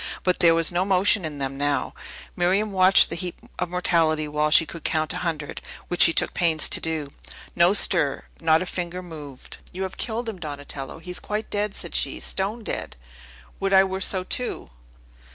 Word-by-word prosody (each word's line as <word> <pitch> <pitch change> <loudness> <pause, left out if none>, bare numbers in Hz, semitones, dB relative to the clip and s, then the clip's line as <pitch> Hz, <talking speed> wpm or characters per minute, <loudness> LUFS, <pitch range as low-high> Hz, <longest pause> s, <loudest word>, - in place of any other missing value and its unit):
But 180 -1 +1
there 165 -1 +5
was 165 0 +3
no 175 +1 +1
motion 195 0 +2
in 150 -2 -6
them 135 0 -4
now. 145 0 0 0.4
Miriam 195 +4 +1
watched 190 0 +5
the - - -2
heap 175 +1 -5 0.2
of - - -2
mortality 165 -3 +1
while 150 +1 0
she 160 - +5
could 160 +1 -10
count 155 -1 0
a - - -4
hundred, 165 -5 -4 0.3
which 175 - -1
she - - +9
took - - +1
pains 165 -3 +3
to - - +3
do. 155 -3 -3 0.4
No 175 +3 +4
stir; 165 -8 +3 0.2
not 160 +1 +3
a - - -7
finger 180 0 -5
moved! 150 -6 -11
"You 185 +2 -5
have 190 0 -6
killed 230 +1 -3
him, 215 -5 -5
Donatello! 145 -3 -6
He 165 +2 -9
is 180 - -6
quite 210 +1 -5
dead!" 205 0 -1
said - - -4
she. - - 0
"Stone 205 +4 -2
dead! - - -5 0.6
Would 195 0 -1
I 190 0 +7
were 190 0 -4
so, 185 0 +1
too!" 250 - -3
175 Hz, 195 wpm, -24 LUFS, 155-190 Hz, 0.6 s, she